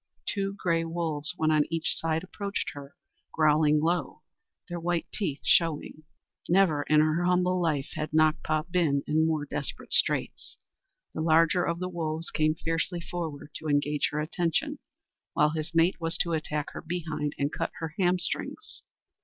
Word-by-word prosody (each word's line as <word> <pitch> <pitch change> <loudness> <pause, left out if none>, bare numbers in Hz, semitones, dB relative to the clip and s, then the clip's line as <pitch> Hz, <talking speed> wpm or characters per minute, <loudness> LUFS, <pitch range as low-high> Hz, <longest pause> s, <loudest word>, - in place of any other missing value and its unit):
Two 195 -1 -1
gray 170 -4 0
wolves, 165 -1 -1
one 155 0 +2
on 150 -1 +4
each 165 0 +1
side, 160 0 -1
approached 200 +2 -4
her, 140 -1 -10 0.4
growling 150 -1 +4
low 160 -1 -1 0.4
their 175 -1 -4
white 170 0 -1
teeth 160 -10 -2
showing. 160 -2 +2 0.5
Never 175 -5 +4
in 150 0 +6
her 155 +3 +2
humble 180 0 +2
life 150 -4 0
had 155 - -3
Nakpa 155 0 +2
been 155 -6 +2
in 160 +1 +2
more 155 -2 0
desperate 145 0 -5
straits. - - 0 0.6
The 155 - -3
larger 165 +2 +4
of 170 -1 -1
the 180 +1 -3
wolves 165 -2 -3
came 155 0 +2
fiercely 165 +2 -2
forward 165 -4 -5
to 160 - -7
engage 145 0 +1
her 150 - -3
attention, 165 +1 -1 0.5
while 150 0 +3
his 155 +1 -4
mate 165 +1 +3
was 165 0 -1
to 170 - 0
attack 150 -1 -2
her - - -7
behind 160 -3 -3
and 140 +1 0
cut - - -2
her 160 -2 -5
hamstrings. 180 -1 -1
160 Hz, 160 wpm, -28 LUFS, 150-175 Hz, 0.6 s, in